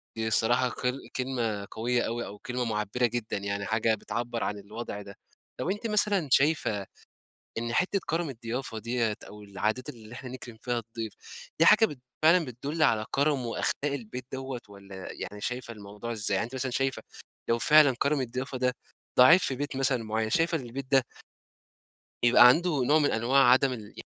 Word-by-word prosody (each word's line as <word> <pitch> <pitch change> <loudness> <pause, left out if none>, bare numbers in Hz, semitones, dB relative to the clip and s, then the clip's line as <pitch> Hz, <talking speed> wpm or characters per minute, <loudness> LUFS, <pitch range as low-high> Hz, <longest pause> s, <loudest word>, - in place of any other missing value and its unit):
دي 110 0 -2
الصراحة 120 +3 +3
كل 125 +2 -4
كلمة 115 -6 -2
قوية 120 +2 0
أوي، 120 +1 -3
أو 105 - -9
كلمة 125 +3 -3
معبِّرة 105 +2 0
جدًا، 115 -3 -2
يعني 100 0 -3
حاجة 110 +1 +1
بتعبَّر 115 +3 -4
عن 105 - -2
الوضع 105 0 -7
ده. 100 0 -12 0.4
طَب، - - -3
أنتِ 210 +3 -3
مثلًا 205 -6 +2
شايفة 135 -10 +2 0.7
إن 115 0 -3
حتّة 190 +2 +1
كرَم 165 -2 -1
الضيافة 115 -1 -5
ديّة، 115 -1 -1
أو 105 0 -12
العادات 105 +5 -2
اللي 115 0 -10
إحنا 125 0 -8
نكرم 120 -3 -9
فيها 120 -1 -1
الضيف، 115 -1 -6 0.5
دي 165 - +5
حاجة 220 +1 +7
بت 145 - -9 0.2
فعلًا 165 +1 +5
بتدُل 140 +6 -4
على 110 -6 +3
كرَم 140 -3 +1
وأخلاق 115 - 0 0.2
البيت 125 -1 -6
دوّة، 130 -2 -5
والّا 100 -1 -10
يعني 105 0 -7
شايفة 125 +1 -3
الموضوع 105 +3 -7
إزاي؟ 105 -3 0
يعني 105 - 0
أنتِ 130 - -11
مثلًا 130 0 -2
شايفة 135 +1 -1 0.5
لو 115 0 +2
فعلًا 145 +1 +6
كرَم 140 -1 +1
الضيافة 130 +1 -4
ده 125 0 +1 0.4
ضعيف 165 +9 +8
في 130 - +2
بيت 145 -1 -4
مثلًا 130 -4 +1
معيَّن، 110 0 -1
شايفة 165 +3 +2
إن - - -7
البيت 130 +3 -6
ده 135 -3 +4 1.2
يبقى 120 0 +8
عنده 155 0 +3
نوع 150 +5 +4
من 145 - +2
أنواع 130 +4 +3
عدم 130 0 +4
ال 105 -4 -10
125 Hz, 180 wpm, -28 LUFS, 110-135 Hz, 1.2 s, ضعيف